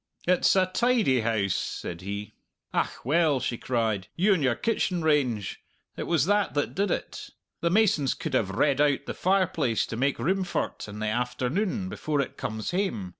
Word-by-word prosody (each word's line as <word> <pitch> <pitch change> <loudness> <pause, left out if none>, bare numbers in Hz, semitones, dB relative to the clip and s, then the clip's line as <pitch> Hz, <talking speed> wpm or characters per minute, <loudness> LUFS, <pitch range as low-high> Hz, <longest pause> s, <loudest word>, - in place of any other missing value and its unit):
"It's 180 +1 +4
a 190 -1 +4
tidy 195 - +2
house!" 110 -4 +1
said 85 0 -4
he. 100 +2 -5 0.4
"Ach, - - -2
well," 150 0 +3
she 125 - -2
cried, 110 -6 -1
"you 195 +4 +4
and 175 - 0
your 130 -4 +2
kitchen 185 - 0
range! 125 -10 +1 0.3
It - - -5
was 160 -5 +2
that 205 -1 +1
that 145 - 0
did 200 +2 0
it! - - -4 0.3
The 170 - +1
masons 175 - +3
could - - -5
have 95 - +2
redd 135 +8 +2
out 145 -2 +2
the - - -4
fireplace 170 - +1
to - - -6
make 135 +4 +1
room 190 +10 0
for't 175 - -3
in 105 0 -8
the 110 0 -2
afternoon 125 - -1
before 155 -6 -2
it 140 - -2
comes 110 +5 -4
hame. 175 - -1
145 Hz, 180 wpm, -27 LUFS, 115-185 Hz, 0.4 s, It's